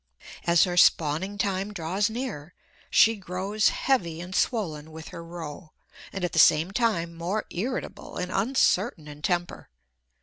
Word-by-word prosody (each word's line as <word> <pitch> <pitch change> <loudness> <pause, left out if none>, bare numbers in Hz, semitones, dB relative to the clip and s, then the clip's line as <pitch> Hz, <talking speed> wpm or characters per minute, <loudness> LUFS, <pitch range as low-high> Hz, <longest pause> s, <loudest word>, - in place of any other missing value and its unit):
As 170 0 +5
her 180 -2 -1
spawning 170 +4 +3
time 195 0 -1
draws 195 +3 -1
near, 220 - -5 0.3
she 225 0 +5
grows 195 +2 0
heavy 170 -12 0
and 180 +2 -7
swollen 160 -10 -1
with 160 0 -9
her 170 - -8
roe, 165 -1 -8 0.4
and 195 - -5
at 175 - -3
the 160 - +1
same 160 +4 +5
time 195 -7 0
more 175 +6 -3
irritable 245 +8 -4
and 180 0 -3
uncertain 195 - +1
in 150 0 -10
temper. 175 +2 -2
180 Hz, 145 wpm, -26 LUFS, 165-205 Hz, 0.4 s, As